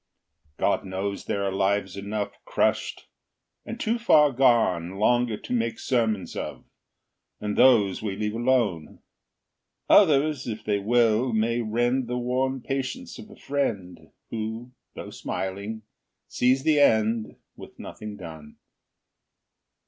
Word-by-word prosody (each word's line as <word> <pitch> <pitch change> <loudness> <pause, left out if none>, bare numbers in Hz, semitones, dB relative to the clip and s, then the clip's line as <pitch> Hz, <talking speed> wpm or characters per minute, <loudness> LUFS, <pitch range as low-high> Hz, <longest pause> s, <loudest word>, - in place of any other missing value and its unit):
God - - +1
knows 95 +1 -4
there 100 - -2
are 100 - 0
lives 95 0 0
enough, 100 +1 -5
Crushed, - - -1 0.6
and 230 +2 -6
too 230 +1 0
far 150 -10 +5
gone 115 -9 +2
Longer 120 +2 +2
to - - -6
make 115 -1 -1
sermons 110 -6 -1
of, - - -6 0.7
And 105 0 -3
those 110 -7 +4
we 105 -3 -3
leave 105 +1 -2
alone. 115 -9 0 0.9
Others, 150 -7 +4
if 110 -2 -5
they 105 -1 0
will, 115 +2 +2
may 115 +2 +1
rend 120 +3 0
The 125 +1 -2
worn 130 +2 -1
patience 135 - -4
of 215 - -11
a 215 - -13
friend 115 -11 -3 0.2
Who, 115 +2 -5 0.2
though - - -8
smiling, 100 +4 -5 0.4
sees 130 +2 +2
the 155 -1 +3
end, 110 -4 +2 0.2
With - - -13
nothing 105 -1 -8
done. 80 -5 -10
115 Hz, 125 wpm, -25 LUFS, 100-130 Hz, 0.9 s, far